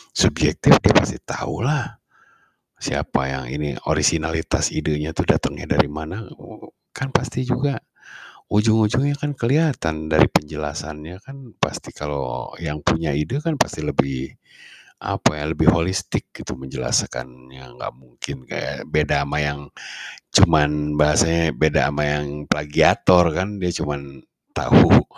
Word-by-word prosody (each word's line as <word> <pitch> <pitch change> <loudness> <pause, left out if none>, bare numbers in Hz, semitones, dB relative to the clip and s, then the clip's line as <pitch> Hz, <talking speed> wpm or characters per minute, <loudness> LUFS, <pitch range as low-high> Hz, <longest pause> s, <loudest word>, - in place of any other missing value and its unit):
subjektif - - +5
dia - - +5
pasti - - +3
tahulah 140 +2 -3 0.8
siapa 65 - -2
yang 65 -2 -5
ini 75 +1 -3 0.2
orisinalitas 80 0 +1
idenya 75 +1 -2
tuh - - -2
datengnya - - -1
dari - - +5
mana 80 +8 -7
oho - - -15
kan 130 - -4
pasti 130 -1 -1
juga 135 +2 0 0.7
ujung-ujungnya 110 +6 +2
kan 145 +1 -4
keliatan 115 - 0
dari 80 0 +6
penjelasannya 75 +3 -4
kan. 135 0 -12 0.2
pasti - - -3
kalau 75 -2 -5
yang 75 -3 -5
punya 80 -2 0
ide 75 - -2
kan 165 +1 -2
pasti 145 - 0
lebih 65 -1 -1 0.7
apa 75 - 0
ya, - - -4
lebih 80 - +3
holistik 90 +2 -2
gitu 60 - -8
menjelaskannya 65 -1 -4
gak - - -6
mungkin 65 0 -10
kayak - - -5
beda 75 -2 +2
ama 70 +1 -2
yang 75 -1 -1 0.7
cuman 75 -2 +4
bahasanya 80 +2 +3
beda 75 -2 +2
ama 75 +1 -1
yang 75 0 -1 0.2
plagiator 85 +4 +4
kan, 100 +3 -3
dia 90 - 0
cuman 70 -2 -6 0.3
tahu - - +7
75 Hz, 125 wpm, -21 LUFS, 75-95 Hz, 0.8 s, tahu